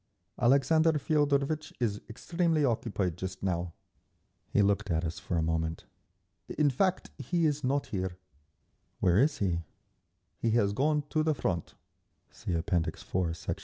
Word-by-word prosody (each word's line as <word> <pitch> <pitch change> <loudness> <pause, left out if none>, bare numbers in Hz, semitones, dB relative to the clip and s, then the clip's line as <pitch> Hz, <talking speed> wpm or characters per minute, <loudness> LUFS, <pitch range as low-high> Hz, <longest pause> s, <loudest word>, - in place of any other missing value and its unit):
"Alexander 155 +6 +4
Feodorvitch 145 0 +1
is 105 -4 -1
extremely 165 +5 0
occupied 100 -8 -1
just 95 +1 -6
now…." 90 -2 -1 0.8
He 105 - +3
looked 100 +1 +1
at 80 0 0
us 80 - -4
for 90 - -2
a 80 - +1
moment. 80 0 -1 0.7
"In 150 -2 +4
fact, 185 +7 0
he 175 -2 0
is 150 -1 0
not 140 +2 +1
here…." 95 -2 -2 0.8
"Where 90 +2 +4
is 145 +4 +3
he?" 90 -4 0 0.8
"He 115 - +1
has 100 -3 +2
gone 150 +5 +1
to 155 - +2
the 155 -1 +1
Front. 85 - -2 0.6
(See 90 - -4
App. 85 +2 -2
IV, 85 0 -1
Sect. - - -4
110 Hz, 145 wpm, -30 LUFS, 90-150 Hz, 0.8 s, Alexander